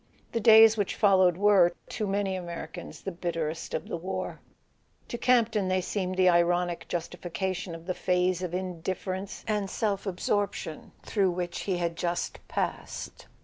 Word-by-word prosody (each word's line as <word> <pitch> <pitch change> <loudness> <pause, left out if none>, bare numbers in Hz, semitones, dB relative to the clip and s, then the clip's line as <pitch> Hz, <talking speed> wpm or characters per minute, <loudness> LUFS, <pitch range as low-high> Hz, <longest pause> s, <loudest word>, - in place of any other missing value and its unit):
The 230 - 0
days 225 0 +8
which 205 -3 -1
followed 190 -4 +4
were, 195 -3 +5 0.2
to 215 - -2
many 195 -1 0
Americans, 175 -1 -7
the 195 - -4
bitterest 165 -2 -3
of - - -4
the - - -3
war: 185 +3 -4 0.7
to - - -3
Campton 230 -5 +3
they 185 0 +2
seemed 185 0 -2
the 185 -1 +5
ironic 175 0 +2
justification 180 +1 -3
of 165 0 -11
the 185 - -1
phase 180 0 +1
of 180 -2 -3
indifference 185 +2 -4
and 210 -3 0
self 205 -1 -1
ab¬ 195 -3 -2
sorption 195 -5 -2
through 195 -3 +1
which 175 -1 -3
he 190 -3 -1
had 170 -1 -1
just 175 +1 -2
passed. - - -4
185 Hz, 155 wpm, -28 LUFS, 175-200 Hz, 0.7 s, days